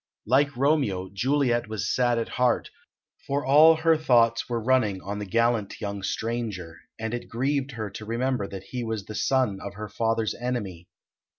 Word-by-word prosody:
Like 140 +3 +2
Romeo, 125 -10 +1
Juliet 125 +2 +1
was 105 -2 -3
sad 120 -1 +2
at 115 - -2
heart, 125 -1 +1 0.6
for 140 +1 -1
all 155 +4 +7
her 160 +1 +3
thoughts 120 -7 +3
were 120 -1 -1
running 110 -5 +2
on 100 +3 -5
the 105 - -5
gallant 115 -1 +1
young 100 -2 -4
stranger, 105 -4 -3 0.2
and 110 +1 -4
it 120 - -5
grieved 135 +2 -1
her 110 -3 -5
to 110 - -8
remember 120 -1 -1
that 95 -1 -8
he 125 +3 -5
was 110 -3 -3
the 110 - -8
son 120 -3 +1
of 100 0 -7
her 105 +1 -6
father's 115 -1 0
enemy. 105 -9 -4
115 Hz, 175 wpm, -26 LUFS, 105-130 Hz, 0.6 s, all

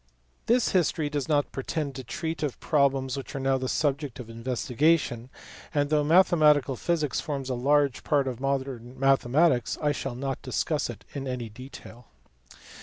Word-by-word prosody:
This 240 +1 +3
history 160 -4 +1
does 145 0 -2
not 145 -2 +1
pretend 140 +1 -3
to 130 0 -7
treat 160 +6 -4
of 145 -4 -3
problems 135 -3 +1
which 135 0 -7
are - - -2
now 135 0 +1
the 130 0 -3
subject 145 -4 -1
of 115 -2 -8
investigation, 125 +2 0 0.5
and 145 0 +1
though 150 -1 +3
mathematical 150 -5 +4
physics 155 0 -1
forms 135 -3 -4
a - - +1
large 140 +2 +2
part 140 -2 +1
of 125 -2 -4
"modern 130 -2 -3
mathematics" 135 0 +3
I 150 -1 +1
shall 135 -3 -4
not 135 +1 -4
dis - - -1
cuss - - -1
it - - -9
in 135 -1 -5
any 125 -3 -4
detail. 125 0 -12
135 Hz, 170 wpm, -27 LUFS, 130-150 Hz, 0.5 s, mathematical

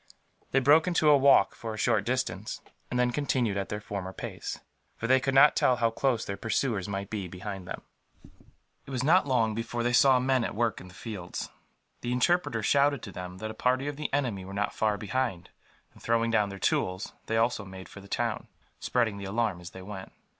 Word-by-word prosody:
They 135 - +3
broke 145 +6 +5
into 160 -4 +4
a - - +8
walk, 140 -7 +5
for 110 -1 -6
a - - -9
short 110 -3 +2
distance; 110 -5 -2 0.3
and 125 - -1
then 125 0 +3
continued 125 -6 0
at 100 -1 -3
their 105 - -3
former 100 -3 -5
pace, - - -6 0.4
for - - -4
they 130 +2 +5
could 135 +1 -1
not 140 +2 +7
tell 125 - +4
how 115 -1 +1
close 120 -1 0
their 100 - -3
pursuers 110 -3 -1
might 100 0 -4
be 100 -4 -3
behind 95 +1 -7
them. - - -6 1.0
It - - -10
was 130 -2 -2
not 165 +2 +4
long 115 -5 +2
before 115 +2 -3
they 120 0 +1
saw 135 0 +6
men 130 -1 +2
at - - -3
work 115 0 0
in 90 - -11
the 90 - -15
fields. 95 -6 -6 0.5
The 120 - -2
interpreter 125 -4 +1
shouted 140 +2 +3
to 100 - -7
them 90 0 -7
that 110 +2 -5
a - - -8
party 130 +4 +1
of 145 - -3
the 150 +1 -4
enemy 125 -9 -1
were 95 +1 -8
not 100 0 -1
far 105 -1 +1
behind 105 -4 -2 0.4
and, - - -18
throwing 115 0 +1
down 105 -3 +2
their 100 - -7
tools, 95 +1 -1
they 115 - 0
also 115 -1 +1
made 95 -1 -10
for 100 - -12
the 100 - -14
town, - - -2 0.3
spreading 115 -5 0
the 100 - -6
alarm 100 -3 -1
as 85 - -8
they 95 0 -11
went. 95 -1 -8
115 Hz, 220 wpm, -28 LUFS, 100-130 Hz, 1.0 s, a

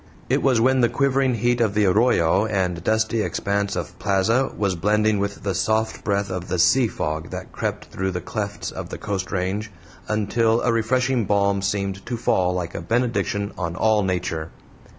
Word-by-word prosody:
It - - +2
was 130 -4 +3
when 130 +2 +3
the 120 - +4
quivering 135 -2 +1
heat 120 +2 +1
of 105 -3 +1
the 105 -1 +3
arroyo 100 -1 +3
and 90 -5 -1
dusty 110 +1 +1
expanse 100 -1 -1
of 90 +1 -5
plaza 105 +6 +1
was 100 -3 +1
blending 105 +4 +2
with 100 0 -3
the 100 -1 -1
soft 110 +5 0
breath 100 -1 0
of 95 -1 -4
the 90 - -1
sea 100 +9 +4
fog 80 -6 -3
that - - -7
crept - - -3
through 95 0 -2
the 90 -1 -3
clefts 100 +3 -4
of - - -7
the - - -6
coast 100 -3 -4
range, 95 +3 -2 0.4
until 110 +2 +1
a 115 - +2
refreshing 120 +1 +1
balm 100 0 +2
seemed 100 0 -2
to 120 0 -2
fall 95 -5 +1
like 90 -2 -3
a - - -5
benediction 110 0 0
on 85 -2 -3
all 110 +1 +3
nature. 90 -4 -2
100 Hz, 185 wpm, -23 LUFS, 95-115 Hz, 0.4 s, the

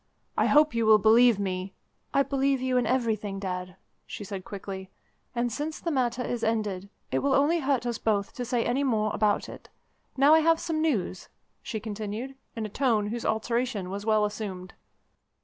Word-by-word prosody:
I - - +2
hope 300 +1 +5
you 230 -1 +1
will 215 -1 +8
believe 225 +2 +5
me 190 -1 -3 0.2
" - - -46
"I 275 - +3
believe 275 0 +1
you 255 0 -1
in 245 - +1
everything, 220 -6 0
Dad," 185 -2 -4 0.3
she - - -7
said 195 -1 -6
quickly; 195 -3 -7 0.5
"and 240 0 0
since 300 +6 -4
the 335 - -2
matter 250 -3 0
is 240 -2 -3
ended, 205 -4 -1 0.2
it - - +1
will 275 -1 +2
only 305 +5 +3
hurt 270 -4 0
us 235 -2 -2
both 205 -3 0
to 250 - -4
say 245 -1 0
any 255 +4 +1
more 215 -5 +1
about 210 -1 +1
it. - - -11 0.5
Now, 280 +3 +6
I 320 - +7
have 325 +1 +3
some 315 -2 -2
news," 225 - -1 0.3
she 220 -4 -4
continued, 215 +4 -5 0.2
in 225 -1 -3
a - - -2
tone 220 -3 +1
whose 235 +2 -3
alteration 220 -3 -1
was 200 +1 -4
well 215 -1 +3
assumed. 200 -3 -5
225 Hz, 190 wpm, -27 LUFS, 205-260 Hz, 0.5 s, will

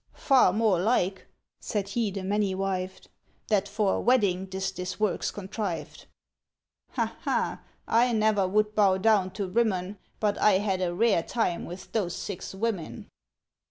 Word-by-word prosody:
Far 265 -9 +4
more 210 -3 +2
like," 190 -2 0 0.3
said 200 -2 -3
he 220 +1 0
the 195 -1 -5
many 200 0 0
wived, 190 -1 -3 0.4
"That 205 -2 +2
for 205 -1 +1
a - - -1
wedding 200 -7 +2
'tis 190 0 -3
this 180 +1 -6
work's 210 -3 0
contrived. 190 -5 -5 0.9
"Ha - - -2
ha! - - -1 0.3
I 240 +2 +3
never 215 -3 +2
would 210 +2 +1
bow 200 -3 +4
down 200 -2 +3
to 195 0 -3
Rimmon, 195 -2 0 0.2
But 210 -2 0
I 210 - +5
had 190 -1 0
a 175 -1 -1
rare 210 -3 +3
time 175 -2 -1
with 180 +2 -9
those 190 -6 -1
six 195 -1 -6
women!" 195 -5 -3
195 Hz, 155 wpm, -27 LUFS, 185-215 Hz, 0.9 s, I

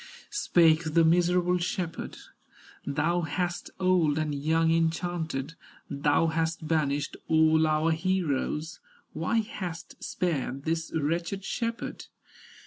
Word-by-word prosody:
Spake 160 -2 +3
the 165 -1 +6
miserable 180 +2 +3
shepherd: 175 -1 -3 0.7
"Thou 155 +5 +1
hast 175 +2 -2
old 180 -5 +3
and 155 -1 -1
young 160 +3 +2
enchanted, 165 -3 -1 0.4
Thou 145 +3 +2
hast 160 0 -1
banished 145 -3 0
all 160 0 +4
our 155 +1 +2
heroes, 160 -3 -1 0.3
Why 230 -1 +1
hast 180 -6 -7
spared 140 -6 -2
this 165 +1 -2
wretched 170 +5 -1
shepherd?" 230 0 -4
165 Hz, 105 wpm, -28 LUFS, 155-175 Hz, 0.7 s, the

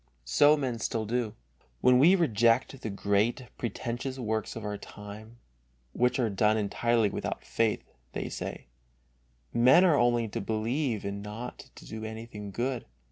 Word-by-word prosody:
So 145 - +5
men 130 -5 -2
still 115 -1 -2
do. 115 -1 -1 0.5
When 125 0 +6
we 170 +8 +7
reject 120 - +2
the 110 - -3
great, 100 +5 0
pretentious 120 +3 -3
works 110 -3 -2
of 115 -2 -6
our 105 0 -2
time, 105 +3 -10 0.6
which 125 +1 +2
are 125 -3 +2
done 105 +1 +2
entirely 110 +1 +1
without - - -4
faith, 115 -1 0 0.3
they - - -3
say: - - -6 0.9
Men 130 +10 +6
are 170 -5 +5
only 120 -1 +3
to - - -4
believe 110 +3 -1
and 100 0 -4
not 105 +4 -7
to - - -13
do 110 0 -7
anything 110 -2 -7
good. 120 +4 -3
115 Hz, 150 wpm, -29 LUFS, 105-125 Hz, 0.9 s, we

